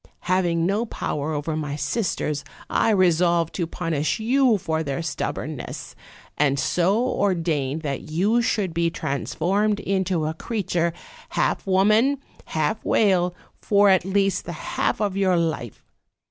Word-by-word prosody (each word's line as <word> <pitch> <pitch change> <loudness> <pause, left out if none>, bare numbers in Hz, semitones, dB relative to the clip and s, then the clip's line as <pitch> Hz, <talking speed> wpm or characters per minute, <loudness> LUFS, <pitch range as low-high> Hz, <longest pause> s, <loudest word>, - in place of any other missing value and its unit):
Having 175 -2 +1
no 205 +6 0
power 150 -6 -3
over 155 +1 -2
my 150 -2 -3
sisters; 150 -5 -1 0.3
I - - +2
resolved 175 -4 +3
to 170 -3 -2
punish 165 +1 -1
you 245 0 +3
for 160 -3 -2
their 140 +1 -3
stubbornness, 150 -2 -4 0.5
and 140 -2 +3
so 180 +7 +2
ordained 165 - 0
that 140 +1 -4
you 200 +9 +2
should 205 -7 0
be 170 0 +1
transformed 195 +8 -1
into 190 -5 0
a 155 - -1
creature, 175 -3 -1 0.4
half - - 0
woman, 215 +9 +4 0.3
half 155 +8 -1
whale, 180 -4 +2 0.3
for 205 -1 +4
at 190 -2 +4
least 195 0 +1
the 175 - -5 0.2
half - - 0
of 205 -3 0
your 190 -2 +2
life. 160 -9 -3
175 Hz, 135 wpm, -23 LUFS, 160-200 Hz, 0.5 s, woman